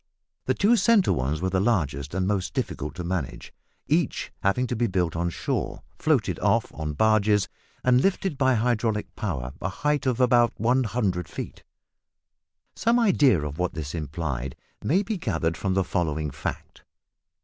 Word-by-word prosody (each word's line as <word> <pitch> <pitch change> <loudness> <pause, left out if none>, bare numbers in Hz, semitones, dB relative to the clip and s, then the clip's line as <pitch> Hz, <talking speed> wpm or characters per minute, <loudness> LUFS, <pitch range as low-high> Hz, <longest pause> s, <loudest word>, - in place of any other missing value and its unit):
The - - +1
two 225 +4 +4
centre 225 -4 +4
ones 70 +5 -1
were 95 0 0
the 95 - +2
largest 80 - 0
and 95 -1 +1
most 95 -2 -1
difficult 75 - -3
to 90 - -5
manage, 85 -5 -4 0.3
each - - 0
having 100 +6 +2
to 125 - -2
be 120 +1 +1
built 90 -4 0
on 85 +1 0
shore, - - -3 0.2
floated - - +1
off - - +1
on 75 0 -4
barges, 105 +1 +3 0.4
and 125 0 +4
lifted 190 -2 0
by 130 -2 +3
hydraulic 115 -2 0
power 70 - -3
a 95 - -1
height 145 +6 0
of 125 -1 +1
about 120 -1 +4
100 115 -6 +1
feet. - - -7 1.1
Some 230 +1 +2
idea 150 - +4
of 75 +1 -5
what 90 0 -1
this 75 -3 -5
implied 70 -5 -3 0.3
may 185 +7 +2
be 210 -1 -3
gathered 85 - -1
from 95 +1 -1
the 95 - +3
following 80 -3 -1
fact. - - -6
95 Hz, 160 wpm, -26 LUFS, 80-125 Hz, 1.1 s, two